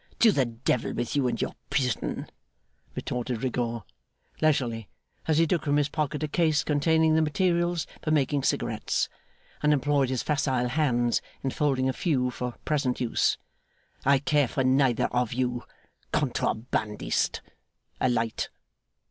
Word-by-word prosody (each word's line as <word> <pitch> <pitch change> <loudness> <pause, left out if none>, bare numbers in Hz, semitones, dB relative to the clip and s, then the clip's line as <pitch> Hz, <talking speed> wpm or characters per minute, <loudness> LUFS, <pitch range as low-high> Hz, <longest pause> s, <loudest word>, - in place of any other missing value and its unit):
'To 230 - +6
the 135 -8 +2
Devil 115 +1 -1
with 120 +2 -2
you 140 -3 +2
and 120 - -2
your - - -2 0.2
prison,' 125 -6 -1 0.7
retorted 125 -1 -3
Rigaud, 120 -3 -2 0.6
leisurely, 120 -8 +1 0.4
as 155 -2 +3
he 165 - +5
took 170 +1 0
from 145 0 +2
his 145 -1 +2
pocket 150 -1 -2
a - - 0
case 155 0 +2
containing 160 +2 +3
the 160 - +4
materials 175 +1 +1 0.2
for - - -3
making 145 -2 +2
cigarettes, - - 0 0.5
and 150 - +3
employed 145 -2 +2
his 130 -2 -1
facile 130 -4 0
hands 120 -4 +1 0.2
in 135 - 0
folding 135 -3 +1
a 130 - +1
few 130 -5 0
for 125 0 -4
present 140 -5 0
use; 120 -2 +1 0.7
'I 140 +1 +5
care 145 0 +2
for 135 - -1
neither 130 -2 +3
of 125 -2 0
you. 125 -2 -1 0.5
Contrabandist! 115 -6 -1 0.6
A 130 - +2
light. 115 -2 -1
135 Hz, 145 wpm, -27 LUFS, 125-150 Hz, 0.7 s, To